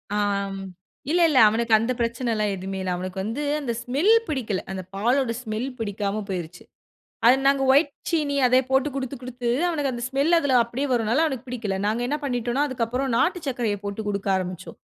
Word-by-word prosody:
ஆம். 200 -1 -1 0.5
இல்ல, 350 - +3
இல்ல. 270 - +4
அவனுக்கு 230 +1 0
அந்த 230 +3 -1
பிரச்சனலாம் 230 -3 0
எதுமே 190 +1 -5
இல்ல. 185 -1 -2
அவனுக்கு 185 +1 -5
வந்து 235 +8 -3 0.2
அந்த 240 -4 -2
ஸ்மெல் 285 - +2 0.2
பிடிக்கல. 235 -10 -2
அந்த 190 -1 -4
பாலோட 240 +4 +1
ஸ்மெல் 220 +3 -3
பிடிக்காம 205 -1 -2
போய்ருச்சு. 175 -2 -5 0.6
அத 240 - +9 0.2
நாங்க 275 -1 +3
வைட் 285 +1 +4 0.2
சீனி 300 -4 0
அதே 255 +1 +5
போட்டு 265 +2 +2
குடுத்து, 270 0 -3
குடுத்து 245 -1 -4 0.2
அவனுக்கு 290 -5 -1
அந்த 240 0 -5
ஸ்மெல் 280 +6 +2
அதுல 285 -5 0
அப்டியே 250 +5 -3
வருனால 235 +6 +2
அவனுக்கு 265 -4 -4
பிடிக்கல. 220 -6 -3
நாங்க 220 +3 0
என்ன 295 +3 -1
பண்ணிட்டோனா 245 +1 0
அதுக்கு 245 -3 -1
அப்பறம் 250 +1 -1
நாட்டு 360 +1 +2
சர்க்கரய 235 -5 -1
போட்டு 200 +2 -4
குடுக்க 200 -1 -2
ஆரம்பிச்சோம். 185 -1 -6
240 Hz, 175 wpm, -24 LUFS, 210-270 Hz, 0.6 s, அத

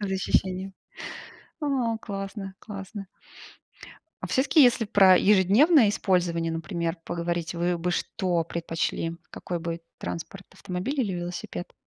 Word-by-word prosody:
за 195 -2 -2
ощущениями. 190 0 0 0.9
О 260 -6 0
классно, 195 -2 -6
классно. 195 -1 -8 1.2
А - - 0
все-таки, 285 +3 +4
если 245 -2 +4
про 195 -3 +6
ежедневное 210 - +5
использование, 175 -4 +1
например, 165 0 -2
поговорить, 170 0 -3
вы 175 +1 0
бы 175 +1 -1
что 175 -1 -1
предпочли? 165 0 -2
Какой 175 -1 -4
бы 165 0 -4 0.2
транспорт- 195 +4 -6
автомобиль 190 +9 -3
или 205 -6 -1
велосипед? 175 0 -5
190 Hz, 115 wpm, -26 LUFS, 170-205 Hz, 1.2 s, про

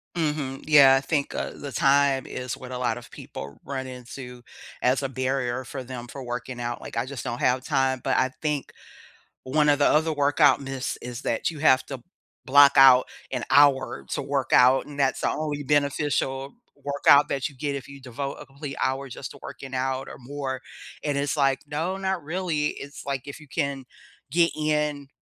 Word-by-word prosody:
Mhm, 150 -5 -2
yeah, 140 -3 +7
I 135 - +2
think, 145 -1 -1
uh, - - -3
the 140 -2 -8
time 140 -1 +3
is 125 -1 -5
what 130 0 -10
a 125 - -4
lot 125 0 -1
of - - -12
people 70 +1 -9
run 135 -1 -4
into 125 -1 -9 0.4
as 130 +3 +2
a 135 - -1
barrier 130 -1 -2
for 130 +1 -6
them 125 -1 -7
for 135 +2 -8
working 125 0 -5
out, 120 0 -3
like, - - -9
I 115 +1 0
just 135 -1 -7
don't 120 -1 -3
have 125 +1 +1
time, 135 -3 +1
but 135 +1 0
I 130 - +2
think 150 -3 -2 0.7
one 150 +3 +3
of 145 - +3
the 145 - +4
other 160 +1 +3
workout 145 0 +4
myths 135 -1 -4
is 125 +2 -7
that 115 - -1
you 155 -3 -9
have 130 -4 +4
to 135 -3 -7 0.4
block 140 +1 +7
out 130 -1 +8 0.2
an - - -3
hour 140 -2 +4
to - - -1
workout, 135 -2 +3
and 145 -1 -8
that's 135 -1 +1
the - - +2
only 150 -2 -3
beneficial 140 -1 0 0.2
workout 145 0 +4
that 135 -1 -1
you 140 - -16
get 140 +2 -2
if 135 -3 -6
you 140 0 -10
devote 135 +2 -5
a - - -11
complete 140 0 -8
hour 135 +1 -1
just 125 +1 -7
to - - -12
working 135 -1 -9
out 130 +1 -2
or - - -10
more, 135 0 -5 0.4
and 145 -2 -1
it's 140 +1 -1
like, 135 -1 +2
"No, 160 +6 -2
not 190 -2 -2
really," 160 -1 -1
it's 140 -1 -8
like, 135 -2 -2
if 140 +1 -8
you 150 - -15
can 135 -1 -2 0.4
get 170 +3 +3
in 150 -2 -1
135 Hz, 195 wpm, -25 LUFS, 130-145 Hz, 0.7 s, out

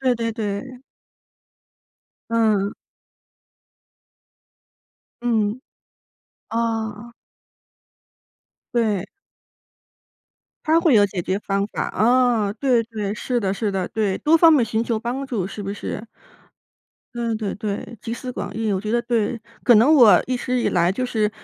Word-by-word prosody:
对 255 -2 +2
对 230 -1 -2
对。 230 +4 -5 1.5
嗯。 215 -3 +2 2.5
嗯。 225 -1 0 0.9
啊。 225 0 -2 1.6
对。 210 -5 +1 1.6
他 320 +1 +4
会 330 -5 +3
有 205 -2 +6
解 185 -2 -4
决 190 +3 -1
方 200 -1 -1
法。 - - -3
啊， 235 -3 +2
对， 250 -3 +2
对， 210 -3 -4
是 245 +3 -2
的， 195 -2 0
是 205 +1 -2
的， 190 -2 -2
对， 205 -4 -1
多 315 +2 +4
方 330 0 +7
面 270 -6 +4
寻 220 0 -1
求 230 -2 -1
帮 250 +4 -4
助， 210 -8 -2
是 205 +1 -7
不 195 - -4
是？ 210 +2 -6 1.1
对 235 -1 -2
对 215 -2 -3
对， 210 +2 -5
集 230 - -4
思 250 +1 -6
广 - - -6
益。 220 -1 -1
我 190 - -1
觉 215 +2 -3
得 235 0 +1
对， 235 -1 -1 0.2
可 240 - +6
能 235 +8 +6
我 245 -9 +7
一 255 - -1
直 250 0 -1
以 - - +1
来 175 +1 +2
就 255 +6 -2
是， 215 -4 0
225 Hz, 145 characters per minute, -22 LUFS, 205-245 Hz, 2.5 s, 方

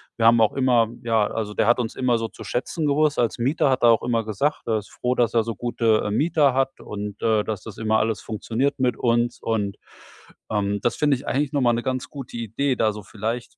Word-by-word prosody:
wir 115 - 0
haben 115 0 +6
auch 110 -2 +3
immer 125 -4 +3 0.2
ja, 115 -3 +2
also, 105 -2 -4
der 105 - +1
hat 120 +1 +4
uns 115 -2 -3
immer 125 -2 +1
so 115 0 -3
zu 110 - -11
schätzen 135 - -2
gewusst 150 +1 +2
als 120 0 0
Mieter, 140 +4 +2
hat 130 -2 0
er 120 - +7
auch 115 - +2
immer 115 -2 0
gesagt, 110 +8 -1
er 110 -1 +2
ist 105 - -7
froh, 125 +1 -2
dass 120 -3 +1
er 115 -1 +3
so 115 +1 -4
gute, 115 -1 +1
äh, 105 - -1
Mieter 145 +2 +2
hat 135 +1 0
und, 105 0 -7
äh, 110 -2 +2
dass 105 -4 -4
das - - -9
immer 110 0 +1
alles 110 -1 -1
funktioniert 120 +6 -2
mit 125 -2 +1
uns. 120 0 0
Und, 105 -3 -1 0.7
ähm, 100 -1 -1
das 120 - 0
finde 145 -3 +2
ich 130 - -12
eigentlich 140 +1 0
noch 145 - 0
mal 120 -2 +3
'ne 120 +1 -2
ganz 130 -1 -2
gute 135 -4 -8
Idee, 120 +4 -1
da 110 -1 +2
so 105 0 -9
vielleicht 115 +3 -5
115 Hz, 245 wpm, -23 LUFS, 110-130 Hz, 0.7 s, er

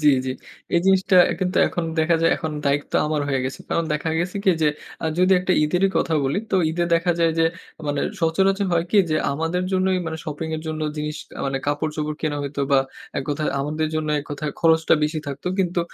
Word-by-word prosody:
জি, 150 - +6 0.2
জি। 130 - -1 0.4
এই 170 - +4
জিনিসটা 190 -1 +4 0.2
কিন্তু 185 -1 -1
এখন 175 - -2
দেখা 165 +2 +3
যায়, 165 - +4
এখন 160 -1 -4
দায়িত্ব 140 +1 0
আমার 150 -1 0
হয়ে 135 -1 +1
গেছে। 130 - -4
কারণ 170 - 0
দেখা 150 +2 -1
গেছে 175 +3 -2
কি 190 - +6
যে, 150 - +5 0.3
আ - - -3
যদি 185 +1 +4
একটা 180 0 +1
ঈদেরই 180 +5 +2
কথা 165 - +1
বলি। 140 +9 0
তো - - +1 0.2
ঈদে 170 +1 0
দেখা 170 +1 +2
যায় 165 -1 +4
যে, 165 - +4 0.4
মানে 145 -1 0 0.2
সচরাচর 195 +4 +2
হয় 170 0 +2
কি 210 - +4
যে, 155 - +2 0.2
আমাদের 165 +5 -1
জন্যই 185 0 +2
মানে 160 0 -3
শপিং 155 +1 -4
এর 155 - -7
জন্য 155 0 -3 0.2
জিনিস 150 0 -3
কা - - -12
মানে 135 0 -1
কাপড়-চোপড় 150 +1 -2
কেনা 150 -2 -1
হইতো 140 0 -4
বা 140 - +6 0.4
এক - - -2
কথায় 150 +1 -1
আমাদের 155 +2 -1
জন্য 155 -1 -1
এক - - -11
কথায় 150 +1 -3
খরচটা 160 -1 +4
বেশি 150 +1 0
থাকতো। 140 +3 -6
কিন্তু 180 -2 +1
160 Hz, 215 wpm, -22 LUFS, 150-175 Hz, 0.4 s, জি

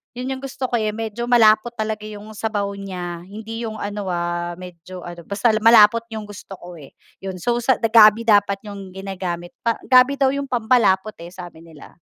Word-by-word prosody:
'yun 250 +2 -5
'yung 260 - -10
gusto 270 -1 -4
ko, - - -1
eh, 215 -1 -1
medyo 225 +1 -5
malapot 225 -1 +4
talaga 215 -1 -3
'yung 210 0 -9
sabaw 210 -2 -2
niya 180 -3 -6
hindi 220 +4 -7
'yung 220 -1 -6
ano, 205 -1 -5
ah, 175 0 -2
medyo 180 0 -10
ano, 175 -1 -9
basta 205 +4 +1
malapot 230 0 +6
'yung 215 -1 -6
gusto 200 -1 -10
ko, 175 0 -11
eh, 140 - -13 0.3
'yun 190 -1 -5
so 240 +5 0 0.3
gabi 220 0 +7
dapat 205 -2 +3
'yung 200 -2 -9
ginagamit, 185 -3 -5
pa 230 -1 0
gabi 260 +2 +5
daw 270 - +4
'yung 280 - -2
pampalapot, 220 -4 +1
eh, 170 - -10
sabi 175 -3 -10
nila. 160 0 -15
210 Hz, 185 wpm, -21 LUFS, 185-225 Hz, 0.3 s, gabi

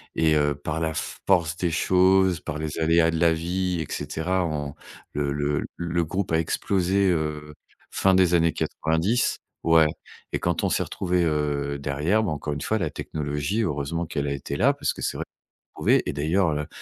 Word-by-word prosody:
et, 80 -1 +3
heu, 75 -1 +2
par 75 +3 -4
la 80 -1 -1
force 85 -1 0
des 90 - 0
choses, 95 +2 +3
par 75 - -5
les 75 0 -4
aléas 80 +1 +4
de 80 - -2
la 85 -1 +4
vie 90 +1 -1
et 75 - -6
cetera, 90 +3 -1
on 75 -3 -3 0.4
le 70 -1 -1
le 75 0 -1
le 85 0 -1
groupe 90 +3 -3
a 80 - +3
explosé, 95 +3 +1
heu, 75 -3 -2 0.4
fin 95 - +3
des 90 -2 +4
années 85 -1 +3
90, 80 +10 0 0.2
ouais 80 -1 +5 0.5
et - - 0
quand - - -1
on - - +2
s'est - - +1
retrouvés, 90 -2 -1
heu, 75 -2 -1
derrière, 75 +10 +1
ben, 90 - -1
encore 75 0 -3
une 70 - -5
fois, 110 - 0
la 85 -7 -1
technologie, 75 +8 -3
heureusement 75 0 -2
qu'elle 70 -2 -3
a 70 - -1
été 70 0 -5
là, - - +4
parce - - -1
que - - -10
c'est - - -2
vrai - - -4 0.5
trouvé - - +3
et - - -1
d'ailleurs, 80 +6 +1
heu, 75 0 -2
80 Hz, 195 wpm, -25 LUFS, 75-90 Hz, 0.5 s, ouais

